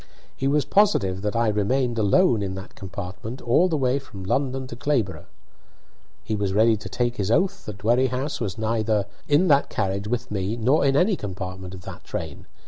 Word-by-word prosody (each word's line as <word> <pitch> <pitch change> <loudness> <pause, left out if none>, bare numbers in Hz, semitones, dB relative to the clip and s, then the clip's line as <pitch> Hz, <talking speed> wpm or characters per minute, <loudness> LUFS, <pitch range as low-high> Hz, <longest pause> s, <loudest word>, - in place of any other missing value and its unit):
He 135 - -1
was 145 +1 +2
positive 105 - +2
that 105 +1 -2
I 115 0 +2
remained 115 +3 0
alone 110 - +4
in 95 -1 -3
that 95 0 -9
compartment 100 +5 -7
all 165 +10 +3
the 160 - 0
way 130 0 +1
from 100 -8 -10
London 130 +5 -1
to 130 - -8
Clayborough. 120 -7 -1 1.0
He 110 - -2
was 100 -2 -1
ready 110 +1 +5
to 105 - -8
take 120 0 -1
his 100 -1 -1
oath 185 - +1
that 105 -2 -6
Dwerrihouse 125 +6 0
was 100 -5 -3
neither 110 -2 0 0.2
in 150 +6 +4
that 140 -1 +4
carriage 100 +1 -2
with 120 0 -3
me 100 +2 -2
nor 130 +7 +3
in 135 -1 +3
any 190 +5 +3
compartment 95 - -6
of 90 - -11
that - - -9
train. - - -6
115 Hz, 190 wpm, -24 LUFS, 100-135 Hz, 1.0 s, ready